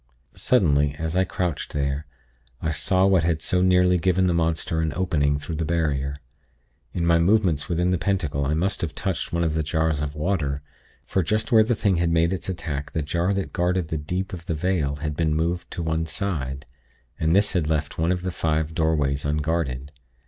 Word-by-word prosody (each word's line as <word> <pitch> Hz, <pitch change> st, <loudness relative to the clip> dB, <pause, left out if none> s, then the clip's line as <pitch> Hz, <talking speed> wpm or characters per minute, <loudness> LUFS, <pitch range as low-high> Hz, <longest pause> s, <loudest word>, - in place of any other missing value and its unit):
"Suddenly, 75 Hz, -, +2 dB
as 80 Hz, +2 st, -3 dB
I 95 Hz, 0 st, +3 dB
crouched 90 Hz, -4 st, -3 dB
there, 70 Hz, +1 st, -1 dB, 0.5 s
I 80 Hz, -, -1 dB
saw 95 Hz, +5 st, +2 dB
what 95 Hz, -3 st, +4 dB
had 80 Hz, -1 st, +1 dB
so 90 Hz, +3 st, 0 dB
nearly 90 Hz, 0 st, +4 dB
given 95 Hz, +2 st, +2 dB
the 90 Hz, -, +2 dB
monster 80 Hz, -1 st, 0 dB
an 80 Hz, -1 st, 0 dB
opening 75 Hz, -6 st, +1 dB
through 75 Hz, +2 st, -5 dB
the 80 Hz, -, -1 dB
barrier. 75 Hz, -4 st, 0 dB, 0.8 s
In 85 Hz, -, -1 dB
my 85 Hz, 0 st, +4 dB
movements 90 Hz, -4 st, +2 dB
within 90 Hz, +1 st, +1 dB
the 90 Hz, -, +1 dB
pentacle 80 Hz, -7 st, 0 dB
I 70 Hz, +3 st, 0 dB
must 95 Hz, +6 st, -1 dB
have 80 Hz, -3 st, -3 dB
touched 95 Hz, -3 st, -2 dB
one 85 Hz, 0 st, 0 dB
of 80 Hz, -2 st, 0 dB
the 80 Hz, -, 0 dB
jars 80 Hz, 0 st, 0 dB
of 75 Hz, 0 st, -3 dB
water; 75 Hz, -4 st, -1 dB, 0.4 s
for 95 Hz, -, 0 dB
just 110 Hz, -, -1 dB
where 110 Hz, -2 st, +7 dB
the 115 Hz, +2 st, +1 dB
thing 100 Hz, -4 st, +1 dB
had 85 Hz, 0 st, +1 dB
made 85 Hz, +2 st, +2 dB
its 95 Hz, -, -4 dB
attack 80 Hz, -6 st, -4 dB
the 80 Hz, -, -1 dB
jar 85 Hz, +5 st, 0 dB
that 95 Hz, -, -3 dB
guarded 90 Hz, -1 st, 0 dB
the 80 Hz, -, -1 dB
'deep' 90 Hz, +6 st, -3 dB
of 85 Hz, -1 st, -7 dB
the 85 Hz, -, -1 dB
'vale' 75 Hz, -4 st, 0 dB
had 75 Hz, -1 st, -2 dB
been 80 Hz, -1 st, +1 dB
moved 85 Hz, +3 st, -1 dB
to 85 Hz, -, -4 dB
one 80 Hz, 0 st, -1 dB
side, 70 Hz, -9 st, -3 dB, 0.5 s
and 80 Hz, +2 st, +2 dB
this 100 Hz, +1 st, +3 dB
had 85 Hz, -5 st, 0 dB
left 75 Hz, -2 st, -1 dB
one 85 Hz, +2 st, +2 dB
of 90 Hz, -1 st, -1 dB
the 95 Hz, -, -2 dB
'five 80 Hz, -1 st, -1 dB
doorways' 75 Hz, -4 st, +1 dB
unguarded. 75 Hz, -3 st, -1 dB
80 Hz, 205 wpm, -24 LUFS, 75-90 Hz, 0.8 s, where